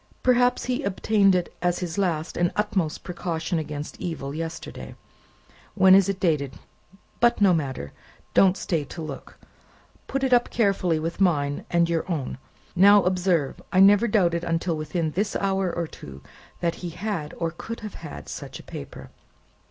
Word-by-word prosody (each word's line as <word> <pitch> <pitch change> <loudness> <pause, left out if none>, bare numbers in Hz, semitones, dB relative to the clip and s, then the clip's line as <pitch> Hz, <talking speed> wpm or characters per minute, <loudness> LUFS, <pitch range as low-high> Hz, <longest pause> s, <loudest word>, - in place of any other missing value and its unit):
"Perhaps 250 0 +3
he 255 +2 -1
obtained 200 -3 +2
it 180 -1 -1
as 175 0 +1
his 175 0 -4
last 165 -4 -1
and 175 0 +1
utmost 190 -7 -1
precaution 170 -1 -3
against 150 -1 -6
evil, 140 -5 -4
yesterday. 165 +1 -6 0.8
When 190 -2 +6
is 195 0 +6
it 195 -1 -2
dated? 150 -7 0 0.7
But 235 0 +3
no 200 -3 +5
matter; 135 - -3 0.4
don't 190 0 +5
stay 165 -4 -1
to 155 +4 -8
look; 145 -3 -8 0.7
put 270 0 -2
it 260 -1 +2
up 245 0 +4
carefully 195 -7 +1
with 165 +4 -4
mine 145 -6 +1
and 170 -1 +3
your 170 +2 -1
own. 140 -5 -3 0.4
Now, 200 +2 +7
observe! 180 -5 0
I 185 - +3
never 205 +4 +6
doubted 175 -6 +2
until 165 0 -1
within 155 +1 -2
this 200 +6 -1
hour 195 -2 0
or 170 0 -2
two, 70 - -11 0.4
that 170 -1 +1
he 175 - -4
had, 170 -3 -4
or 165 -1 -1
could 225 +7 -7
have 215 -1 -8
such - - -7
a - - -12
paper. - - -9
175 Hz, 160 wpm, -25 LUFS, 160-195 Hz, 0.8 s, Now